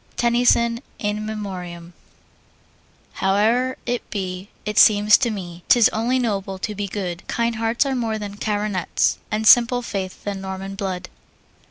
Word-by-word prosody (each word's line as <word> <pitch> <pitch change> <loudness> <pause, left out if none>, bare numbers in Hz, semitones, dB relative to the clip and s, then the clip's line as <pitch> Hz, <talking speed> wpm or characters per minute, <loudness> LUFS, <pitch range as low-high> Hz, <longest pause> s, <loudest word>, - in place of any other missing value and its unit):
TENNYSON, 235 -1 +3 0.2
In 210 0 -3
Memoriam. 180 -5 -6 1.3
Howe'er 225 +7 +2
it 245 0 -3
be, 185 -1 -5 0.2
it 210 0 +1
seems 210 0 +6
to 245 - +1
me, 175 -5 -7
'Tis 240 -3 +6
only 235 +4 0
noble 200 -6 -2
to 210 +3 -4
be 205 0 -4
good. 185 -3 -4
Kind 235 -1 -1
hearts 225 +4 +1
are 275 - -1
more 230 -4 -1
than 205 -1 -7
coronets, 205 -4 0
And 215 +1 -2
simple 245 +2 +6
faith 190 -4 -5
than 200 -2 -4
Norman 190 0 -6
blood. 190 -2 -4
210 Hz, 145 wpm, -22 LUFS, 190-230 Hz, 1.3 s, seems